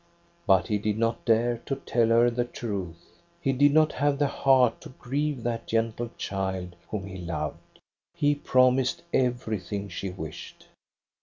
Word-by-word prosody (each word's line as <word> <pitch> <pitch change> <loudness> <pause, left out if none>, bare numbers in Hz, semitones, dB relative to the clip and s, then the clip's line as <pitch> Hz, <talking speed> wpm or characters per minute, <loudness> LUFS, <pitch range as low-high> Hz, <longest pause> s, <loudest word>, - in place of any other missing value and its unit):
But 95 -2 +5
he 105 -3 0
did 105 0 -1
not 115 0 -1
dare 115 +1 +2
to 135 - 0
tell 120 -3 +1
her 115 +1 +4
the 120 +1 0
truth. 100 -8 -6 0.2
He 135 -5 0
did 145 +2 +4
not 155 +1 +4
have 145 0 +1
the 145 - +2
heart 130 -3 +3
to - - -10
grieve 140 0 -2
that 120 -1 -3
gentle 115 +1 -1
child 95 -2 -3
whom 100 -3 -4
he 95 -1 -8
loved. 75 -4 -5 0.4
He 145 0 +3
promised 130 +1 +2
everything 110 -6 -1
she 95 +2 -4
wished. 85 -2 -9
115 Hz, 155 wpm, -27 LUFS, 100-130 Hz, 0.4 s, But